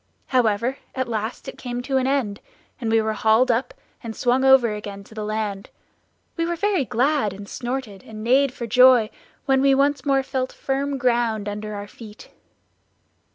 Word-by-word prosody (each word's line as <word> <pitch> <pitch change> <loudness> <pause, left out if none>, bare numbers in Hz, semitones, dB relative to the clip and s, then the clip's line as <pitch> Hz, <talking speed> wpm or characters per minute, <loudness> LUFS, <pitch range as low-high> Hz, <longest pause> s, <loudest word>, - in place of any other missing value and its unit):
"However, 240 +1 +1 0.2
at 260 -1 -1
last 220 0 -4
it - - -8
came 245 -1 -4
to 270 +1 0
an 260 0 +1
end, 255 -7 -1 0.4
and 230 -4 -2
we 225 - +4
were 220 0 0
hauled 220 +4 +3
up, 235 +3 -1 0.3
and 225 -2 -7
swung 250 +1 +1
over 265 -4 +5
again 205 -1 -7
to 205 - -17
the 215 -1 -5
land; 210 -2 -3 0.7
we 330 - 0
were 345 +1 -1
very 380 -5 0
glad, 255 -2 +1
and 200 +1 -10
snorted 240 -6 -5
and 215 -1 -9
neighed 265 +3 +3
for 240 - -6
joy, 250 -1 +5 0.3
when 270 -1 +3
we 275 0 +4
once 285 +1 +1
more 275 -2 +2
felt 260 -1 -3
firm 275 +1 -2
ground 235 -4 0
under 210 +1 -5
our 205 0 -6
feet. 215 0 -13
240 Hz, 180 wpm, -23 LUFS, 215-270 Hz, 0.7 s, over